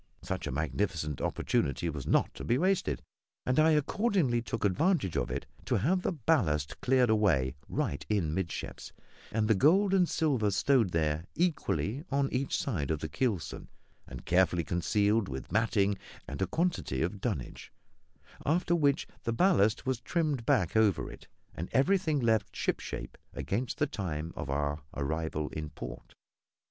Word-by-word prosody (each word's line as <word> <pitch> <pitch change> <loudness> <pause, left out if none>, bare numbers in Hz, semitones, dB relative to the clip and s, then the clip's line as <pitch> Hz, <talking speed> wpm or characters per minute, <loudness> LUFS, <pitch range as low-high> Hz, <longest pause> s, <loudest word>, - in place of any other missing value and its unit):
Such - - -3
a - - -2
magnificent 75 +1 -2
opportunity 70 +5 0
was 75 -5 -4
not - - +2
to - - -8
be 120 - +2
wasted; 175 - +1 0.4
and 125 +3 +2
I 155 +1 +6
accordingly 150 - +2
took 115 -2 -3
advantage 100 - +2
of - - 0
it 65 +3 -3 0.2
to - - +1
have 170 - +2
the - - 0
ballast 110 - 0
cleared 125 -2 +3
away 90 -13 +3 0.2
right 70 - -2
in 95 -8 +1
midships, 95 -3 -4 0.4
and 110 0 +1
the 110 - +5
gold 185 - +4
and 180 -3 +4
silver 135 -10 +1
stowed 115 +2 +3
there 80 -1 0
equally 150 - 0
on 140 0 0
each 130 +2 0
side 85 - -2
of 80 - +1
the 80 - -3
keelson, 90 - -2 0.4
and - - -9
carefully 90 -1 +3
concealed 100 +6 +1
with 65 0 -6
matting 100 -3 +2 0.3
and 70 +4 -6
a 95 - +2
quantity 160 - 0
of 95 +4 -3
dunnage; 100 - -4 0.7
after 170 +3 +1
which 145 -4 +2 0.2
the 115 - -1
ballast 115 - +3
was 130 -2 -1
trimmed 150 -9 -1
back 90 +1 +2
over 110 -5 +3
it - - -13 0.3
and 85 - -5
everything 160 +1 +3
left 110 -5 +1
shipshape - - -3 0.2
against 115 +6 -2
the 150 - +2
time 85 - -4
of - - -5
our 70 +1 -1
arrival 75 +1 -2
in 75 -1 -5
port. - - -9
105 Hz, 155 wpm, -30 LUFS, -, 0.7 s, I